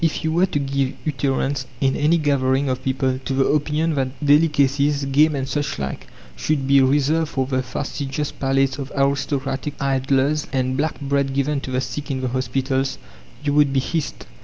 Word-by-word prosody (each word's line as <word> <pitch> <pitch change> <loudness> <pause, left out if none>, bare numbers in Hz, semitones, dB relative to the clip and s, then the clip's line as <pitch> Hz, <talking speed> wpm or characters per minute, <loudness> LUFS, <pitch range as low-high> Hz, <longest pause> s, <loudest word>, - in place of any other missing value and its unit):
If 165 +1 0
you 160 - 0
were 175 +4 +3
to 180 - -2
give 140 -1 -1
utterance, 135 -1 -1
in 135 0 +2
any 155 +3 +3
gathering 140 -2 +1
of 130 0 -2
people, 130 -1 0
to 135 - -2
the 135 0 +3
opinion 150 +2 +1
that 135 +1 -3
delicacies 145 -1 +3
game 145 +3 +3
and 135 -1 -2
such 145 +1 -2
like 70 -1 -5 0.3
should 150 -3 -1
be 140 0 +6
reserved 145 +4 +2
for 130 -1 -1
the 130 0 0
fastidious 140 +2 -4
palates 135 0 0
of 135 -1 -5
aristocratic 140 0 -1
idlers, 135 +2 +1
and 130 -1 0
black 150 +3 -1
bread 140 -1 0
given 140 +1 0
to - - -6
the 130 0 0
sick 130 +4 -5
in 130 -2 -2
the 130 - -1
hospitals, 130 +1 -1 0.5
you 145 -1 0
would 145 -1 +4
be 135 - +2
hissed. 160 +3 -3
140 Hz, 185 wpm, -21 LUFS, 135-145 Hz, 0.5 s, be